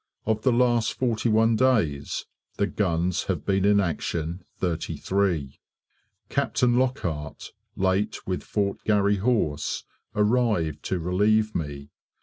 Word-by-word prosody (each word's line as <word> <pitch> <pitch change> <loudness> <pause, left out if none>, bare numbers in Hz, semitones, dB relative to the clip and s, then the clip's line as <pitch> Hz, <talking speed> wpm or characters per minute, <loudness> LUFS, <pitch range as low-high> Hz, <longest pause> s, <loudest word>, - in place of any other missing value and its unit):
Of 110 0 0
the 130 - +3
last 120 -2 +2
41 115 -2 +2
days 110 - +1 0.3
the 100 - +2
guns 90 -3 0
have 90 -5 -2
been 95 -1 +1
in 100 0 +5
action 85 -1 -2
33. 85 -2 -1 0.7
Captain 120 -1 +1
Lockhart, 85 - -2 0.2
late 95 +3 0
with 90 -1 -2
Fort 100 -2 -2
Garry 100 -1 +3
Horse, 100 -9 0 0.3
arrived 105 - +1
to 95 - -1
relieve 105 +5 +2
me. 70 -3 -5
100 Hz, 115 wpm, -25 LUFS, 85-110 Hz, 0.7 s, in